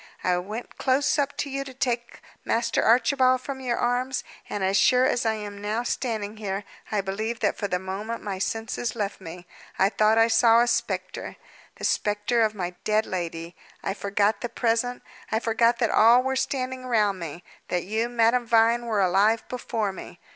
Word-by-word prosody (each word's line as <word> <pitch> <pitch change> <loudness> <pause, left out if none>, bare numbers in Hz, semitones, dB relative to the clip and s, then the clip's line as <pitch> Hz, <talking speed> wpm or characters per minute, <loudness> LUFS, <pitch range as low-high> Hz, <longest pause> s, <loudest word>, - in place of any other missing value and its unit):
I 180 - +2
went 210 +6 -7
close 265 +2 +2
up 285 0 -1
to 285 - -2
you 275 0 -2
to 265 -2 -11
take 240 -2 -2 0.2
Master 230 0 +1
Archibald 255 +2 +4
from 270 0 -6
your 250 -2 -1
arms; 250 +2 0 0.3
and, 205 - -3
as 190 +1 +1
sure 250 +4 +5
as 245 -4 +1
I 220 - +1
am 205 -1 -7
now 215 +3 -1
standing 220 -4 -3
here, 200 -1 -3 0.3
I 210 -2 +1
believe 215 +4 -3
that - - +1
for 205 - -3
the 180 - 0
moment 195 +5 -5
my 195 -2 -4
senses 225 +3 -2
left 205 -3 -3
me. 175 0 -9 0.3
I 195 - +4
thought 215 +1 +3
I 225 0 +6
saw 230 0 +5
a - - +4
spectre 200 -6 -2 0.4
the - - -12
spectre 210 +3 +1
of 215 -1 +2
my 180 -3 -3
dead 215 +1 +2
lady. 170 -1 -5 0.3
I 195 - -1
forgot 200 +1 0
the 240 - -3
present; 235 +1 0 0.3
I 220 - +2
forgot 230 +1 +2
that 235 -2 +1
all 235 +3 +6
were 265 0 -1
standing 260 -1 -2
round 210 -5 +2
me; 170 +1 -7 0.2
that 180 -1 -1
you, 220 +4 -1
Madame 240 0 +2
Vine, 230 +1 +3
were 215 -3 +1
alive 200 +5 +2
before 225 -4 -2
me. - - -10
225 Hz, 190 wpm, -25 LUFS, 200-245 Hz, 0.4 s, I